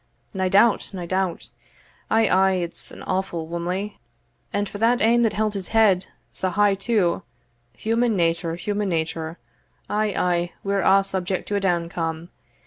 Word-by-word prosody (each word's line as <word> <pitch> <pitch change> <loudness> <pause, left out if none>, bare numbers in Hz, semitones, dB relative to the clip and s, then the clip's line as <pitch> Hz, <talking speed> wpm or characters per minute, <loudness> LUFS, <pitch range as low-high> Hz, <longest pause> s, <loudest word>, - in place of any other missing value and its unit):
"Nae 190 -1 0
doubt, 205 +4 +4
nae 180 -2 -5
doubt 185 0 -2 0.6
ay, 225 0 +4
ay 190 +1 +4
it's 175 -2 -2
an - - -11
awfu' 185 -4 -2
whummle 180 +5 -3 0.6
and 205 0 -1
for 205 +2 -6
ane 235 0 +4
that 225 -3 +2
held 215 0 0
his 195 -3 -4
head 210 -5 +3 0.3
sae 185 - -1
high 205 +2 +3
too 195 -3 +1 0.6
human 230 0 +1
nature, 165 -1 0
human 205 +2 -2
nature 160 -1 -2 0.5
Ay 210 -1 0
ay, 175 -1 0
we're 200 0 0
a' 195 +1 +5
subject 190 -1 -2
to 205 - -1
a - - +2
downcome. 170 -3 -2
190 Hz, 150 wpm, -23 LUFS, 175-210 Hz, 0.6 s, a